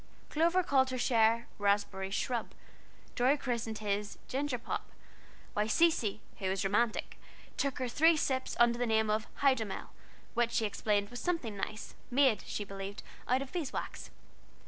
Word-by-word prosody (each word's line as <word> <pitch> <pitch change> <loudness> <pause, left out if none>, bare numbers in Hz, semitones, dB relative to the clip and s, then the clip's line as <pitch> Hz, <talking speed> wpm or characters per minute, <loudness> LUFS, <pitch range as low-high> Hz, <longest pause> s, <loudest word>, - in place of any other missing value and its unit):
Clover 340 +4 +3
called 265 -4 +3
her 255 - -2
share 230 -2 +3
"Raspberry 200 -1 +1
Shrub," 235 +4 -2 0.6
Dorry 260 +4 +3
christened 235 -5 -2
his 205 0 -2
"Ginger 275 -1 -1
Pop," 235 - -4 0.6
while 210 +1 0
Cecy, 225 -7 +3 0.2
who 190 -2 -1
was 190 +1 0
romantic, 215 +3 0 0.4
took 275 -2 -1
her 255 - -1
three 320 +7 +4
sips 260 -3 -1
under 240 0 +5
the 245 - +1
name 220 -1 +2
of 215 +1 0 0.2
"Hydomel," 230 -8 +1 0.4
which 235 0 +1
she 230 -2 +2
explained 205 -1 0
was 245 - -6
something 325 - -1
nice, 215 +2 -5 0.2
made, 255 -5 +4
she 210 - -3
believed, 195 0 -7 0.2
of 260 +2 +1
beeswax. 335 -7 -4
235 Hz, 145 wpm, -32 LUFS, 210-265 Hz, 0.6 s, under